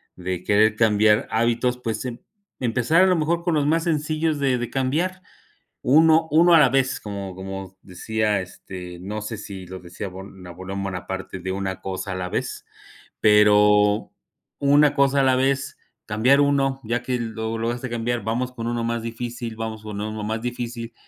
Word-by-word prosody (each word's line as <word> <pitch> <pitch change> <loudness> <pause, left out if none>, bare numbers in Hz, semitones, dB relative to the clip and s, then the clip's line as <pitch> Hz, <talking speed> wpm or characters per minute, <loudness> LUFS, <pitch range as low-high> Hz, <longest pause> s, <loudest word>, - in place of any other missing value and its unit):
de 90 0 -4
querer 110 +2 +3
cambiar 105 -1 +3
hábitos, 120 +2 +1
pues, 115 -3 -3
se 125 - -3
emp 120 - -10 0.4
empezar 125 +7 +2
a - - +5
lo 185 - +3
mejor 170 +1 0
con 170 -2 +1
los 145 -2 +1
más 165 +2 +1
sencillos 155 -1 0
de 130 -3 +1
de 120 - -3
cambiar. 165 +8 -1 0.6
Uno 160 +4 +5
uno 170 +3 +5
a 165 - +8
la 135 - +6
vez, 135 0 +1
como 100 -2 -6
como 95 0 -7
decía, 105 +2 -1
este, 90 -1 -9
no 105 +3 -5
sé, 110 0 -5
si 95 -2 -8
lo 95 +1 -8
decía 90 +3 -7
Bon 95 0 -11
Napoleón 95 +3 -6
Bonaparte 95 0 -5
de 95 +1 -4
una 95 -1 -4
cosa 95 +1 -4
a - - -4
la 90 0 -4
vez, - - -4 0.6
pero 105 0 +4 0.5
una 145 +1 +4
cosa 140 -1 +3
a - - +3
la 130 -1 +4
vez, 135 +1 0 0.3
cambiar 125 +7 +3
uno, 135 -1 +2
ya 120 +2 -1
que 125 -1 -2
lo 110 -1 -4
lo 115 - -3
lograste 120 +2 -3
cambiar, 120 0 -2
vamos 125 +3 -2
con 115 -2 -6
uno 120 -1 -2
más 115 0 -2
difícil. 115 0 -5
Vamos 110 -1 -5
con 105 -2 -6
uno 110 0 -4
más 110 +1 -2
difícil. 120 -1 -5
115 Hz, 185 wpm, -23 LUFS, 100-135 Hz, 0.6 s, a